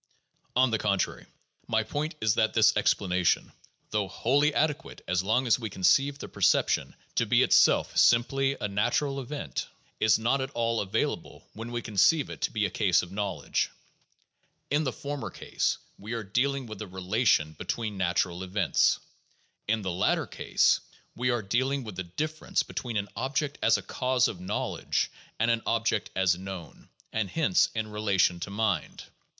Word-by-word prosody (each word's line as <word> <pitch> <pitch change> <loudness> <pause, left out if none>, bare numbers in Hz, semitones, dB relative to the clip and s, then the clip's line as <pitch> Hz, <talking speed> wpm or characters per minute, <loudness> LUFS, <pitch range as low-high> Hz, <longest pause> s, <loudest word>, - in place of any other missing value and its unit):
On 130 -1 +4
the 110 - +1
contrary, 100 -3 -1 0.4
my - - +1
point 155 +2 -3
is 110 -2 +3
that 110 0 +1
this 110 -1 +5
explanation, 90 -3 +1 0.4
though 105 -2 0
wholly 140 +9 +2
ade 150 0 +2
quate - - -13
as 90 +1 +1
long 110 +7 +1
as 120 +1 +3
we 115 -3 -4
conceive 135 +10 +2
the - - -7
perception - - +1 0.2
to - - +1
be - - +4
itself - - +4
simply 135 +3 +3
a - - -1
natural 135 +8 0
event, 140 +3 -5 0.3
is 110 - +4
not 120 +5 +1
at 130 - -3
all 115 -1 +1
available 105 +2 -3
when 115 +2 -7
we 120 -1 -3
conceive 110 - +3
it - - -9
to - - 0
be 105 -2 0
a 100 - -2
case 95 -3 +2
of 90 - -9
knowledge. 100 0 -1 1.0
In 150 +2 +2
the 130 - 0
former 145 -3 -5
case, - - -1 0.2
we 110 +4 -6
are 115 -1 -3
dealing 130 +6 0
with 110 -3 -8
a 110 - -5
relation 95 -3 +1
between 110 +7 -4
natural 85 -1 0
events. 95 +2 +2 0.7
In 110 0 0
the 95 - -2
latter 95 +4 +1
case, - - +2 0.4
we 125 +1 0
are 120 -2 0
dealing 130 +7 0
with 110 -5 -8
the 95 - -3
difference 155 - -2
between 120 -3 -4
an 100 0 -1
object 140 +2 -2
as 115 -1 +4
a 100 - -7
cause 125 +5 +1
of 90 - -6
knowledge 95 +3 -2 0.3
and 115 +2 +2
an 115 -1 +1
object 115 0 0
as 95 -2 +3
known, 90 -6 -9 0.2
and 110 -3 -1
hence 165 - +2
in 110 -1 -2
relation 100 -4 +1
to 95 - -5
mind. 105 0 -1
110 Hz, 170 wpm, -28 LUFS, 95-130 Hz, 1.0 s, this